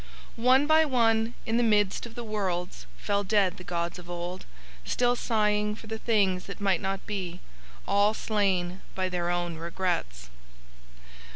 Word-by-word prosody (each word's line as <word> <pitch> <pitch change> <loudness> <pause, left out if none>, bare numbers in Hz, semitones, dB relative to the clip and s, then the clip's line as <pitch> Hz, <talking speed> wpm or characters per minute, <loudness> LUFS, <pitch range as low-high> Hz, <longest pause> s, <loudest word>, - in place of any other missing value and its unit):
"One 260 +3 +5
by 315 +1 +5
one 230 -4 +2
in 225 +1 +1
the - - +3
midst 210 -1 +2
of 230 - -14
the 240 - -5
worlds, 180 - -3
fell 200 - 0
dead 200 -2 +2
the 180 - -9
gods 170 0 -3
of 175 0 -12
Old, 175 +1 -5 0.4
still 245 - +1
sighing 210 -3 +1
for 225 - -12
the 220 0 -5
things 195 -6 +1
that 200 - -7
might 195 -4 +1
not 195 0 -3
be, 185 -4 -4 0.5
all 205 +2 +3
slain 190 -5 0
by 185 -1 0
Their 175 -1 -1
own 175 -1 -1
regrets. 165 - -3
200 Hz, 160 wpm, -28 LUFS, 175-220 Hz, 0.5 s, One